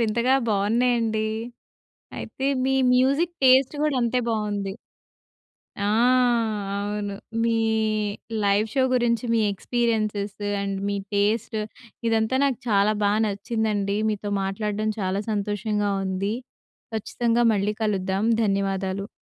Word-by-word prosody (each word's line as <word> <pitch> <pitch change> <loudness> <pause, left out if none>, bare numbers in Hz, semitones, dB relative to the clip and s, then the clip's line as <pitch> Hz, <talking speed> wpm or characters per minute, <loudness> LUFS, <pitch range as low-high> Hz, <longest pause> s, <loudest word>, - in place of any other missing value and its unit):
వింతగా 235 +3 +2
బావున్నాయండి. 220 +1 +1 0.9
అయితే 270 - -5 0.2
మీ 265 - +2 0.2
music 280 +7 +2
taste 260 +2 +5
కూడా 300 -3 +1
అంతే 240 +1 +1
బావుంది. 205 -3 -2 1.1
ఆ! - - +2 0.9
అవును 205 0 -3 0.3
మీ 230 -1 +2 0.9
లైవ్ 200 +2 +2
షో 265 -2 +3
గురించి 240 -1 +1
మీ 225 - +3
ఎక్స్పీరియెన్సెస్ 215 -1 -1 0.2
అండ్ 195 -1 -2
మీ 200 - -1 0.2
టేస్ట్, 215 +2 +1 0.5
ఇదంతా 225 +2 +1
నాకు 265 -3 0
చాలా 205 +1 +3
బా 205 - +3
నచ్చిందండి. 205 -1 -1
మీతో 205 -1 -3
మాట్లాడడం 210 +2 -2
చాలా 190 +1 -1
సంతోషంగా 205 0 -1
ఉంది. 195 +3 -1 0.6
ఖచ్చితంగా 235 +2 0
మళ్ళీ 205 +1 0
కలుద్దాం, 195 -1 0 0.2
ధన్యవాదాలు. 195 -1 -1
210 Hz, 105 wpm, -24 LUFS, 200-235 Hz, 1.1 s, టేస్ట్